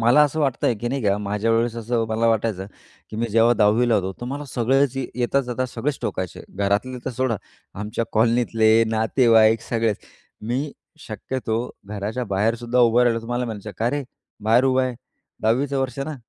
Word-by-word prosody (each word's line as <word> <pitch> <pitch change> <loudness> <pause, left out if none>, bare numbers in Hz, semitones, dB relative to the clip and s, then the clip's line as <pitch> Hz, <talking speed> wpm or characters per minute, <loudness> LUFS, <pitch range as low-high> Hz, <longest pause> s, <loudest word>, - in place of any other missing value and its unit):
मला 120 +6 +5
असं 155 +2 -2
वाटतंय, 130 -4 +1
की 120 +3 -4
नाही 135 -1 -2
का 100 0 +3
माझ्यावेळेस 115 +3 0
असं 115 0 -1
मला 110 +1 +1
वाटायचं, 110 -4 0 0.4
की 110 - -7
मी 115 - 0
जेव्हा 115 +2 +4
10वी 110 +3 +3
ला 115 - +3
होतो. 95 -2 0
तर - - -5
मला 140 +3 -4
सगळेच 135 +3 +1
ये 130 - -2
येता 125 +3 +1
जाता 130 0 -3
सगळेच 130 +4 -3
टोकायचे. 95 -2 -4
घरातले 100 +6 0
तर - - -2
सोडा 125 -1 -1 0.4
आमच्या 105 +2 -2
कॉलनीतले, 115 -1 +3 0.2
नातेवाईक 110 0 +4
सगळेच. 115 -3 0 0.4
मी 130 +7 -3 0.3
शक्यतो 110 +1 -3 0.3
घराच्या 105 +4 -4
बाहेरसुद्धा 115 +5 0
उभं 120 0 +5
राहिलं 115 -1 +2
तुम्हाला 120 +2 -2
म्हणायचं, 110 -3 -6
"का 115 +2 +1
रे? 145 +1 -2 0.4
बाहेर 115 +4 +4
उभा 130 0 +3
आहे, 130 -1 -2 0.5
10वी 115 +6 +2
चं 140 -1 -2
वर्ष 130 0 -3
ना, 150 +3 -3
115 Hz, 175 wpm, -22 LUFS, 110-125 Hz, 0.5 s, मला